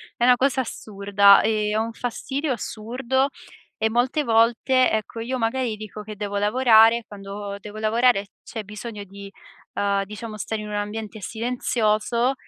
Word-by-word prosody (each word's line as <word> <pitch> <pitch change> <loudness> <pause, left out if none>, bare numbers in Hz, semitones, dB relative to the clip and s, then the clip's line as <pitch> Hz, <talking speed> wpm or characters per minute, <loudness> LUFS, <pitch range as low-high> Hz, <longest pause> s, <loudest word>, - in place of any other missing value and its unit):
è 240 - -2
una 250 0 +7
cosa 265 0 +2
assurda, 200 -3 +3
e 215 -1 0
ho 220 - +2
un 230 0 -5
fastidio 270 +5 -3
assurdo. 250 +5 -2 0.5
E 220 - +2
molte 255 +6 +1
volte, 235 +2 +3
ecco, 220 +1 -3
io, 250 +3 -3
magari, 235 0 -1
dico 215 0 -8
che 210 0 -8
devo 205 0 -4
lavorare 225 +1 +5
e 235 - -7
quando 200 0 -7
devo 210 +2 -10
lavorare 220 -1 +2 0.2
c'è 220 -2 -6
bisogno 210 +1 -8
di, 200 +1 -11 0.4
uhm, 200 -1 0
diciamo 215 +2 -8
stare 215 +1 -3
in 210 - -7
un 210 - -6
ambiente 210 +1 -4
silenzioso, 235 +2 0
220 Hz, 160 wpm, -23 LUFS, 210-240 Hz, 0.5 s, una